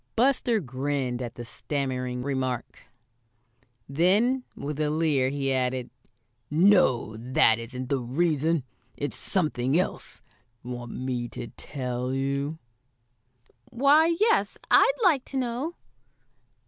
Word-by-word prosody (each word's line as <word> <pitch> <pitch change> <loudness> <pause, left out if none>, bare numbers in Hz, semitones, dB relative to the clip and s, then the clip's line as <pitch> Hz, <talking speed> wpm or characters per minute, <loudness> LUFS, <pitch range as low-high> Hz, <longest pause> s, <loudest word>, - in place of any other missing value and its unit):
Buster 245 -2 +2
grinned 130 -3 -2
at 120 -2 -5
this 120 -1 -8
stammering 125 -3 -3
remark. 130 -3 -3 1.0
Then, 205 - +2
with 145 +1 -5
a 150 -1 +1
leer, 150 -4 +2
he 135 -1 -1
added: 130 -1 -1 0.6
"No, 155 - +4
that 115 -1 +3
isn't 125 +2 -6
the 140 - +1
reason. 155 +4 0 0.3
It's 145 - -3
something 150 -5 +1
else. 185 - -3 0.4
Want 120 -1 -6
me 125 -2 -3
to 120 0 -7
tell 125 -2 -4
you?" 140 +3 -2 1.1
"Why, 300 +6 +4
yes, 450 +2 +2
I'd - - +7
like 310 -9 +4
to 270 - -5
know." 260 +6 -2
140 Hz, 110 wpm, -26 LUFS, 125-180 Hz, 1.1 s, I'd